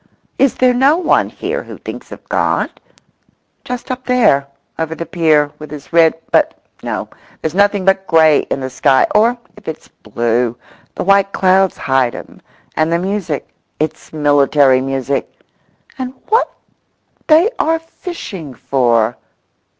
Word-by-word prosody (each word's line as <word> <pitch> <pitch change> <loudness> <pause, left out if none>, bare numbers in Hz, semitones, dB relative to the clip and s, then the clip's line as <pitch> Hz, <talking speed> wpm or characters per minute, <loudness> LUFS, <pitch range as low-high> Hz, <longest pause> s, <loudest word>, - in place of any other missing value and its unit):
Is 275 -2 +3
there 255 -1 +3
no 270 +6 +4
one 360 - +2
here - - -4
who - - -10
thinks - - -9
of - - -11
God?—just 250 +1 -5
up 255 0 -4
there, 225 - +3 0.3
over 160 0 -2
the 170 - -5
pier, 155 -4 +2
with 155 - -9
his 150 +1 -10
rod—but 165 -1 +2 0.2
no—there's 160 - -6
nothing 200 0 +2
but 195 0 +2
grey 160 -3 +5
in 135 - -2
the 130 - -3
sky 130 +1 +3
or 230 +4 +3 0.2
if 210 - -17
it's 160 - -7
blue 120 +2 -1 0.4
the - - -3
white 195 +1 +3
clouds 190 0 +3
hide 130 -3 +1
him, - - -11 0.3
and 155 +1 +1
the 170 - +3
music—it's 170 -4 -4
military 145 -3 +3
music—and 135 - -6
what 450 +3 +2 0.8
they 335 +8 +5
are 325 +1 +2
fishing 275 - -8
for? 120 -2 +1
165 Hz, 130 wpm, -16 LUFS, 140-215 Hz, 0.8 s, grey